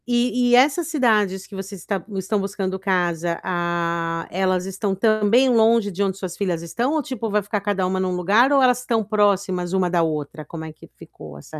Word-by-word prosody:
E 245 0 +1
e - - +7
essas 290 +6 +3
cidades 215 - +1
que 205 - -12
você 195 +1 -7
está 190 0 -4
estão 200 +3 -1
buscando 195 -1 -3
casa, 175 -3 -1
ah, 170 -1 -2
elas 185 0 0
estão 195 +1 -2
também 215 +4 +3
longe 225 -3 +3
de 190 +2 -4
onde 195 -1 0
suas 185 -3 -6
filhas 175 -4 -2
estão 240 - -2
ou, 310 -2 0
tipo, 245 -3 -4
vai 210 0 0
ficar 205 +1 -3
cada 200 -2 -1
uma 185 +1 -1
num 185 -1 -1
lugar 205 +9 +3
ou 275 -2 +4
elas 250 -1 +3
tão 225 -2 +1
próximas 200 -4 0
uma 185 -2 +1
da 175 -1 +2
outra? 155 -1 -3
Como 160 +2 -8
é 160 - -9
que - - -16
ficou 70 - -12
essa 155 - -10
195 Hz, 205 wpm, -22 LUFS, 180-225 Hz, -, e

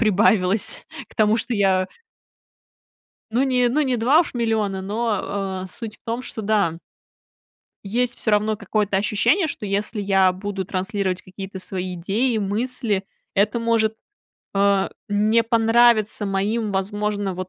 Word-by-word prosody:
прибавилось 205 -2 +2 0.2
к - - -18
тому, 215 0 +3
что 235 +1 -2
я 190 -2 +2 1.5
Ну, 250 +4 +3
не 250 -2 +2
ну, 285 +6 +1
не 260 -3 0
2 260 +8 +4
уж 320 - -3
миллиона, 215 -5 0
но, 215 +1 -1 0.4
а, - - -6
суть 220 +2 -8
в - - -41
том, 235 +2 -2
что, 220 -3 -6
да 200 -6 +1 1.0
Есть 240 +4 0
всё 220 - -1
равно 210 +1 +2
какое-то 210 -2 -1
ощущение, 215 - +2
что, 285 - -5
если 205 +2 -2
я 195 -2 +3
буду 195 0 -4
транслировать 190 0 -2
какие-то 190 +1 -8
свои 185 -1 -4
идеи, 215 +8 0
мысли, 215 0 -1 0.3
это 205 +4 +2
может, 225 -1 +1 0.6
а, 200 -1 +2 0.2
не 215 +3 +3
понравиться 225 -2 +3
моим, 205 +3 -1
возможно, 205 0 -1
вот, 185 0 -5
210 Hz, 140 wpm, -22 LUFS, 195-230 Hz, 1.5 s, 2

